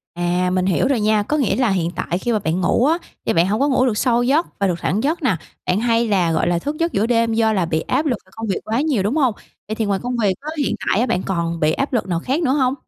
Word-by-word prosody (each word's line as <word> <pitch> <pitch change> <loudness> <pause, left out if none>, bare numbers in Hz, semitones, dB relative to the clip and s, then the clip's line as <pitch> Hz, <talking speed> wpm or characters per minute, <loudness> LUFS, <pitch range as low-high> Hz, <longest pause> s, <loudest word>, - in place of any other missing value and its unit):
À, 175 +1 0
mình 185 0 +1
hiểu 195 +7 +2
rồi 275 -4 +1
nha, 215 0 +2
có 300 +8 -1
nghĩa 275 - +1
là 250 -3 +2
hiện 175 -3 0
tại 175 - -2
khi 240 - -2
mà 215 - +1
bạn 175 -1 -1
ngủ 235 +7 +2
á, 320 +4 +3 0.3
thì - - +1
bạn 165 +2 +3
hông 210 +3 0
có 280 - +2
ngủ 260 -2 +2
được 230 -5 0
sâu 240 0 +2
giấc 290 +7 +2
và 200 - +2
được 180 - 0
thẳng 215 +6 -1
giấc 315 +5 0
nà, 215 -10 +2 0.3
bạn 180 - +2
hay 230 0 +1
là, 185 -6 +2
gọi - - +1
là, 175 -1 +1
thức 290 - -4
giấc 335 0 +1
giữa 200 - +1
đêm 230 -1 +2
do 220 -1 +2
là 185 -4 +1
bị 160 -1 -1
áp 280 +5 -1
lực 255 -6 0
về - - -24
công 225 0 -5
việc 195 - -1
quá 225 +5 0
nhiều, 275 -11 +1
đúng 220 +9 0
hông? 265 -7 +2 0.3
Vậy 215 - -3
thì 220 - -1
ngoài 200 -1 0
công 245 0 -2
việc 205 -5 +2
á, 300 - -6
hiện 285 - 0
tại 195 - +2
á 240 - +2
bạn 180 -7 0
còn 170 -3 -2
bị 155 0 +2
áp 275 - -2
lực 235 - 0
nào 175 -2 -1
khác 270 - -1
nữa 260 - +2
hông? 260 -3 +2
220 Hz, 310 wpm, -20 LUFS, 185-260 Hz, 0.3 s, á